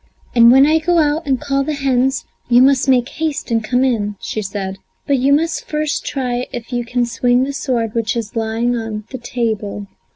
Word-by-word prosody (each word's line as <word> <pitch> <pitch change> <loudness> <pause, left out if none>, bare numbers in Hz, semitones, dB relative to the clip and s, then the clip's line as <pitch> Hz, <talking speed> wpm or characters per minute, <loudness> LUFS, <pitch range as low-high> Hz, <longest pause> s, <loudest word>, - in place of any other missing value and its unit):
"And 235 -1 +7
when 265 +2 +7
I 315 +2 +3
go 345 +2 +1
out 305 0 +1
and 265 -2 +1
call 275 0 0
the 300 +2 -2
hens 265 -1 0 0.2
you 245 +1 +6
must 270 0 +3
make 250 -2 +3
haste 305 -3 -4
and 225 -1 +1
come 245 +4 +1
in," 210 -6 0
she 215 - -4
said. 195 -1 -5 0.3
"But 280 -2 +1
you 270 +3 +2
must 320 +3 +1
first 300 -1 -2
try 250 -2 -2
if 245 -1 -7
you 240 0 -1
can 245 +1 -1
swing 245 +2 +1
the 280 +1 -3
sword 235 -6 -2
which 230 -1 -1
is 225 -1 -5
lying 225 +2 0
on 225 -2 -4
the 260 - -6
table." 220 -4 -3
245 Hz, 205 wpm, -18 LUFS, 230-275 Hz, 0.3 s, And